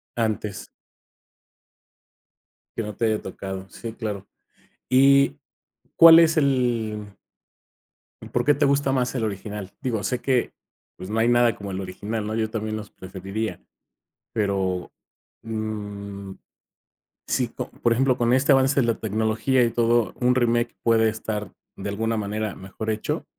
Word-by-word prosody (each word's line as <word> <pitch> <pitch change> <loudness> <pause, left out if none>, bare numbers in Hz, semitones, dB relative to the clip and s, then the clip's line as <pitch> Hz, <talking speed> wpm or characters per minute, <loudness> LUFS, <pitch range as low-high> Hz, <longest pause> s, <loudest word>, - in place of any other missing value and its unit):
Antes. 110 -3 -2 2.1
Que 115 - -2
no 105 -2 -6
te 115 - 0
haya 110 -1 +1
tocado, 95 0 -6
sí, 115 +3 -7
claro, 105 -4 -5 0.6
y 140 +2 +5 0.6
¿cuál 165 0 +10
es 165 -1 +4
el 115 -7 0 1.2
¿por - - 0
qué 145 - +5
te 145 - +2
gusta 140 0 +2
más 125 -1 0
el 115 - -1
original? 105 -1 -5
Digo, 115 -6 -2
sé 125 - -1
que, 130 -3 +1 0.4
pues, 95 - -8
no 110 - -1
hay 115 - +3
nada 120 -2 +4
como 100 -1 -7
el 95 +1 -3
original, 105 +4 -4
¿no? 110 - -2
Yo 110 -1 0
también 110 -1 -3
los 105 -1 -9
preferiría, 95 +4 -5 0.7
pero, 95 -3 -1 0.5
mmm, 105 -3 -5 1.0
si 125 - +1
co - - -6
por 115 - +1
ejemplo, 130 +1 +2
con 120 0 +2
este 140 +3 +3
avance 135 +1 +4
de - - +1
la 115 - +2
tecnología 110 +4 +1
y 115 - +1
todo, 120 -1 +2
un 125 +1 +3
remake 120 -1 +1
puede 110 -1 +4
estar 105 -1 -4 0.2
de 100 +1 -5
alguna 110 +3 -1
manera 105 0 -3
mejor 95 +3 -6
hecho, 110 0 -3
110 Hz, 145 wpm, -24 LUFS, 105-125 Hz, 2.1 s, cuál